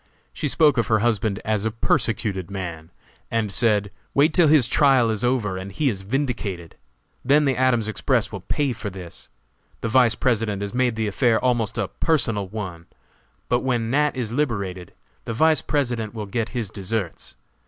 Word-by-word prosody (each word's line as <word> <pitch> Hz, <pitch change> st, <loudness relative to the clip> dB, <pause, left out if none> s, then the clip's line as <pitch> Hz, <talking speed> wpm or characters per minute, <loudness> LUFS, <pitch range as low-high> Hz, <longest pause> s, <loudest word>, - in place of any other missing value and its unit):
She -, -, -2 dB
spoke 145 Hz, -2 st, +3 dB
of 115 Hz, -, 0 dB
her 110 Hz, -, +3 dB
husband 110 Hz, -3 st, 0 dB
as 105 Hz, -2 st, 0 dB
a 110 Hz, -, +1 dB
persecuted 105 Hz, -4 st, -1 dB
man, 85 Hz, -5 st, -6 dB, 0.4 s
and 110 Hz, -3 st, -1 dB
said: 105 Hz, -3 st, +2 dB, 0.2 s
"Wait 150 Hz, +3 st, +4 dB
till 170 Hz, -1 st, +5 dB
his 145 Hz, -5 st, +5 dB
trial 130 Hz, -6 st, +4 dB
is 110 Hz, 0 st, -3 dB
over 120 Hz, -6 st, 0 dB
and 95 Hz, +1 st, -7 dB
he 140 Hz, +6 st, +1 dB
is 95 Hz, -3 st, -6 dB
vindicated! 105 Hz, -, -3 dB, 0.5 s
Then 145 Hz, +3 st, +4 dB
the 135 Hz, -2 st, +2 dB
Adams 125 Hz, -4 st, +2 dB
Express 110 Hz, -, 0 dB
will -, -, -5 dB
pay 140 Hz, -3 st, -1 dB
for 115 Hz, -2 st, -5 dB
this. 90 Hz, -3 st, -10 dB, 0.5 s
The 115 Hz, -, -2 dB
Vice 120 Hz, -1 st, +4 dB
President 110 Hz, -5 st, 0 dB
has 100 Hz, -, -5 dB
made 125 Hz, -2 st, +1 dB
the 110 Hz, 0 st, -1 dB
affair 110 Hz, +2 st, +2 dB
almost 120 Hz, -3 st, 0 dB
a -, -, 0 dB
personal 115 Hz, -, 0 dB
one, 90 Hz, -5 st, -7 dB, 0.6 s
but 120 Hz, -, +2 dB
when 120 Hz, -3 st, 0 dB
Nat. 150 Hz, 0 st, +1 dB
is 115 Hz, -4 st, -3 dB
liberated 100 Hz, -, -2 dB, 0.3 s
the 115 Hz, -, -3 dB
Vice 160 Hz, +6 st, +3 dB
President 120 Hz, -7 st, -2 dB
will 105 Hz, -2 st, -4 dB
get 115 Hz, +3 st, -2 dB
his 120 Hz, -6 st, -4 dB
deserts. 100 Hz, -, -4 dB
115 Hz, 175 wpm, -23 LUFS, 100-130 Hz, 0.6 s, till